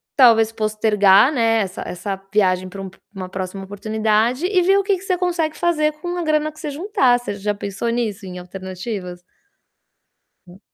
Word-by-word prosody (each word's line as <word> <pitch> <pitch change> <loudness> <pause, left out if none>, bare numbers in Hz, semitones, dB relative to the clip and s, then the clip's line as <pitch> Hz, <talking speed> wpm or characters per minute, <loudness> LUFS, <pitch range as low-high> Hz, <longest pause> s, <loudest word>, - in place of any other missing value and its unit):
talvez 225 -4 +6
postergar, 215 +1 +4
né, 225 -3 +2
essa 190 -1 -4
essa 185 +2 -4 0.2
viagem 185 -3 +2
pra 195 +1 -8
um 190 - -6
p 190 - -21 0.2
uma 185 -2 -6
próxima 190 +1 -5
oportunidade 220 - 0
e 370 -1 +2
ver 385 +3 +4
o 400 - +2
que 400 0 +2
que - - -13
você 370 -2 0
consegue 340 -4 -1
fazer 305 -3 +1
com 350 +3 -5
a 345 - -2
grana 310 0 +1
que 310 - -17
você 300 - -4
juntar. 290 - +2
Você 220 -4 -5
já 205 +1 -2
pensou 200 +3 -4
nisso, 225 -4 -2
em 180 -1 -7
alternativas? 185 0 -7 1.3
Hum. 180 +2 -15
220 Hz, 185 wpm, -20 LUFS, 195-305 Hz, 1.3 s, talvez